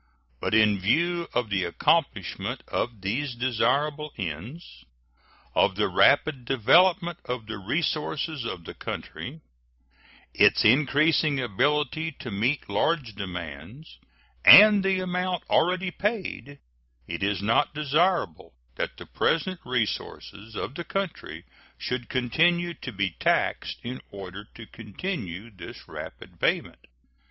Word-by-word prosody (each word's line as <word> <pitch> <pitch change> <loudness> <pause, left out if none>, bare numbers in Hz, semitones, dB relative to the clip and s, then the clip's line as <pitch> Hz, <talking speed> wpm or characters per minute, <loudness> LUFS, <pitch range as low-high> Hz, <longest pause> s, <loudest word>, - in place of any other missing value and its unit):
But - - 0
in 105 -2 +4
view 170 - +1
of 115 -4 -2
the 95 -2 +1
accomplishment 110 - -1
of 115 -4 -3
these 120 +7 -2
desirable 140 +5 0
ends; 85 - -7 0.7
of - - +3
the - - +1
rapid 145 -5 +3
development 170 - +3
of 125 -3 -4
the 110 -1 -6
resources 150 - -2
of 95 -6 -5
the - - -9
country; 150 +6 -7 0.9
its - - +4
increasing 145 +4 +3
ability 145 +7 0
to 125 -3 -8
meet 120 +9 -1
large 120 +4 0
demands, 90 - -8 0.4
and 210 -1 +9
the 190 -1 +1
amount 180 -1 -2
already 180 +2 +2
paid, 190 -9 -3 0.5
it 85 +1 -5
is 100 -1 -1
not 115 +8 +2
desirable 150 - 0 0.2
that - - -3
the - - -10
present 180 +2 0
resources 110 -2 -4
of 130 - -4
the 170 - -5
country 195 -1 -5 0.3
should 125 -1 -4
continue 170 +8 +1
to 135 - -8
be 100 -3 -1
taxed - - 0
in 125 +2 -6
order 100 +1 -9
to 115 - -10
continue 110 - -6
this 95 -4 -11
rapid - - -10
payment. - - -1
130 Hz, 120 wpm, -26 LUFS, 105-165 Hz, 0.9 s, and